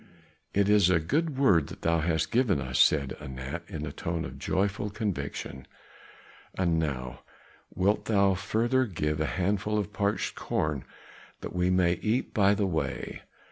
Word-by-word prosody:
"It 100 0 +3
is 105 -3 +5
a 90 -2 +4
good 150 - -1
word 95 - +4
that - - -11
thou 85 0 +2
hast 80 0 0
given 120 - +3
to 70 - -3
us," 65 0 -2
said 70 -3 +4
Anat 65 +3 -6
in 75 -1 -5
a 70 - -5
tone 85 +2 -3
of - - -8
joyful 100 +2 -1
conviction; 75 -10 -4 0.9
"and 85 -3 +1
now 65 -5 -3 0.6
wilt 100 +3 +1
thou 100 -3 +3
further 115 +7 +1
give 75 -5 -2
a 80 - +1
handful 105 +3 0
of 105 0 -2
parched 100 +1 0
corn 75 -4 -2 0.6
that - - -6
we 90 0 +1
may 90 -1 +2
eat 115 +5 0
by 100 -3 +4
the 100 0 +1
way. 80 -4 -3
90 Hz, 165 wpm, -28 LUFS, 80-105 Hz, 0.9 s, is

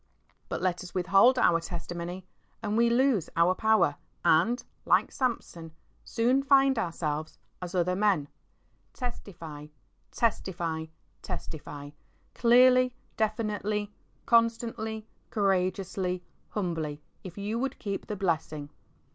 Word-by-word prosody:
But - - -3
let 185 -1 0
us 180 0 -11
withhold 195 +8 +5
our 170 -8 +4
testimony, 175 +1 -6 0.4
and 210 0 -1
we 235 +1 +4
lose 240 - +2
our 170 +2 +4
power 220 -8 +3 0.3
and, 205 +11 +3 0.2
like - - +3
Samson, 175 -10 -3 0.3
soon 245 +4 +2
find 275 -2 +4
ourselves 155 -5 -3 0.2
"as 180 +1 -5
other 180 0 +2
men." 195 -7 +2 0.7
Testify, 165 - -7 0.4
testify, 170 -8 -1 0.3
testify 145 -2 -7 0.2
— - - -38
clearly, 250 +1 +6 0.2
definitely, 210 -1 -1 0.3
constantly, 230 -2 +1 0.2
courageously, 185 -2 0 0.3
humbly 165 -7 -3
— - - -41
if 180 -1 -9
you 210 +3 -2
would 270 +1 -2
keep 200 -3 -4
the 210 - -3
blessing. 160 -6 -2
195 Hz, 115 wpm, -29 LUFS, 170-230 Hz, 0.7 s, clearly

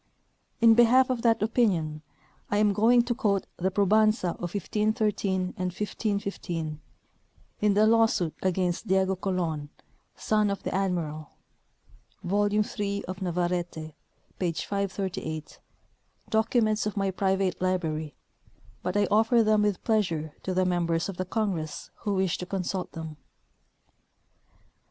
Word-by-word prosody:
In 230 -1 +8
behalf 245 +3 +5
of 245 -2 -1
that 230 -2 +3
opinion 180 -10 +1 0.5
I 205 - +1
am 210 -1 +3
going 235 +4 +4
to 240 0 -1
quote 210 -6 0
the 185 +2 0
pro 200 +1 +1
banza 215 -1 +3
of 175 +2 -5
1513 205 -2 0
and 185 0 -2
1515, 195 -6 -3 0.8
in 210 -1 +3
the 210 +1 +5
lawsuit 225 -7 +3
against 185 +2 0
Diego 190 0 +2
Colon, 175 -6 -2 0.5
son 215 -1 +1
of 200 -1 -3
the - - -3
admiral 170 -5 -2 0.9
(volume 205 +3 +2
3 200 -1 -3
of 185 +1 -7
Navarrete, 175 -3 -2 0.5
page 165 -3 -1
538), 190 -6 -4 0.7
documents 220 -1 +2
of 210 - -4
my 195 -1 +1
private 190 -1 0
library; 160 -5 -1 0.7
but 180 +2 -1
I 205 - +4
offer 225 +2 +4
them 215 -1 +3
with 205 -3 0
pleasure 170 -9 0
to 185 - -3
the 185 0 +2
mem 175 -2 +1
bers 165 +2 0
of 190 - -6
the 185 - -2
congress 180 -7 -3
who 205 -3 -2
wish 190 -2 0
to 180 - -5
consult 185 -1 -3
them. 160 -2 -7
195 Hz, 135 wpm, -27 LUFS, 175-215 Hz, 0.9 s, In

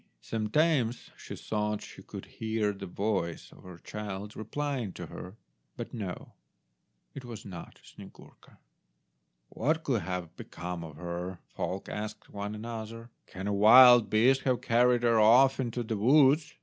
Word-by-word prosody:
Sometimes 120 - 0
she - - -9
thought 105 -1 -3
she - - -12
could - - -9
hear 110 -2 -2
the 95 -1 -8
voice 95 -3 -3
of - - -17
her 90 -2 -11
child 105 +2 -7
replying 130 -1 -3
to - - -7
her; 90 +3 -10 0.4
but - - -7
no, 100 -6 -6 0.8
it 135 - -8
was 120 -3 -9
not 90 -4 -10
Snyegurka. - - -16 0.9
"What 155 +6 -1
could 120 -6 0
have 90 -1 -5
become 90 0 -7
of 80 -3 -10
her?" 90 +2 -5
folk 95 +1 -4
asked 105 0 -6
one 105 +1 -5
another; 115 +1 -7 0.2
"can 95 +1 -8
a 105 - -1
wild 120 +3 +8
beast 130 +5 +4
have 130 -2 0
carried 120 +1 +3
her 115 -2 +4
off 125 +5 +5
into 120 -1 -2
the 110 -1 -3
woods? 140 +6 +4
110 Hz, 150 wpm, -29 LUFS, 100-125 Hz, 0.9 s, wild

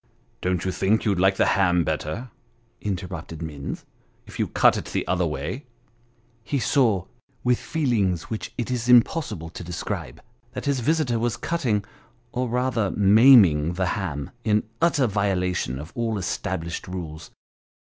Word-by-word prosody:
"Don't 90 -1 -1
you 95 - 0
think 95 +4 +1
you'd 100 -4 +1
like 95 +1 +4
the - - +3
ham 90 -3 +3
better," 80 +10 -3 0.5
interrupted 90 -5 -5
Minns. 75 -3 -6 0.2
" - - -39
if - - -11
you - - +1
cut - - +4
it - - -4
the - - -2
other 90 0 +1
way? 125 - -5 0.4
" 120 -1 -37
He 140 - +2
saw, 115 - +2 0.4
with 125 -1 +2
feelings 110 - 0
which 110 - -5
it 120 +1 -3
is 125 -1 -2
impossible 120 - +3
to 90 - -8
describe 85 0 -5 0.3
that - - -5
his 140 -2 +1
visitor 130 -2 +1
was 120 0 -1
cutting 120 -8 -1 0.5
or 125 -1 -2
rather 120 -4 0
maiming 100 - +6
the 95 +1 -1
ham, 80 -10 -4
in 105 -1 +2 0.2
utter 160 -5 +3
violation 90 - 0
of 75 +5 -8
all 115 -2 -1
established 85 -2 -3
rules. 85 -3 -7
100 Hz, 155 wpm, -24 LUFS, 90-120 Hz, 0.5 s, maiming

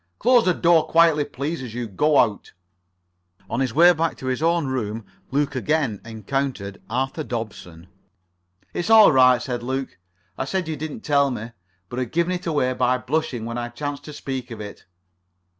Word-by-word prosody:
Close 245 0 +4
the 180 - +3
door 170 -2 +3
quietly, 165 -3 +4
please, 145 +4 -4
as 120 -3 -7
you 120 -1 -3
go 145 +9 +2
out." 110 -4 +1 0.9
[Pg 95 - -30
43]On 120 - 0
his 130 -4 -1
way 175 +3 +7
back 165 0 -1
to - - -9
his 130 +2 -1
own 165 -1 +2
room 115 -5 -3 0.2
Luke 145 +1 0
again 130 -5 0
encountered 110 -2 -4
Arthur 135 +6 -2
Dobson. 100 - -6 0.9
"It's 175 - -3
all 220 -4 +8
right," 130 -2 +5
said 125 -2 -4
Luke, 130 -3 -4 0.4
"I - - -1
said 185 +3 -2
you 160 - -2
didn't 150 +1 -6
tell 140 -1 +2
me, 115 -2 -5 0.4
but 125 - -5
had 125 -3 -3
given 170 +2 +1
it 180 -1 -4
away 145 -5 +1
by 125 0 +1
blushing 130 -3 -2
when 115 +1 -4
I 120 0 -4
chanced 145 +3 -5
to 150 - -8
speak 130 -3 -5
of 115 -2 -8
it." 105 -1 -9
130 Hz, 185 wpm, -23 LUFS, 120-155 Hz, 0.9 s, all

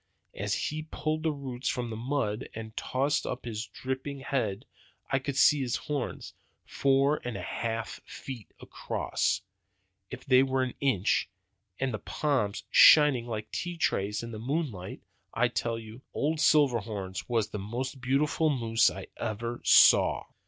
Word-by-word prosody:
As 100 0 -2
he 155 +1 -3
pulled 155 0 -2
the 160 0 +1
roots 135 -3 -4
from 120 -2 -2
the - - -4
mud 115 -2 -2
and 110 0 -7
tossed 140 +3 0
up 125 0 -5
his 115 -1 -4
dripping 130 +1 -5
head 130 -8 -2 0.5
I 135 - +3
could 135 0 -4
see 145 0 +5
his 125 -2 -1
horns 145 -4 -4 0.3
four 140 +2 +2
and 120 -4 -4
a 90 - -6
half 115 +2 -4
feet 120 -6 -9
across, - - -2 0.7
if - - -9
they 130 -2 +6
were 130 -1 +1
an 130 - -3
inch, 125 -9 +1 0.5
and 135 -2 -1
the 110 - -3
palms 130 -9 -1
shining 145 -6 +7
like 110 -2 -5
tea 175 -1 -4
trays 105 -8 0
in 115 - -6
the 110 - -6
moonlight. 125 - -3 0.3
I - - +3
tell 115 -1 -2
you, 110 +2 -10
old 155 +2 0
Silverhorns 115 -11 +1
was 115 -3 +1
the 105 - -5
most 125 +6 -4
beautiful 145 +4 +1
monster 115 -5 +2
I - - -8
ever 115 +2 -3
saw. - - +6
125 Hz, 155 wpm, -29 LUFS, 110-140 Hz, 0.7 s, shining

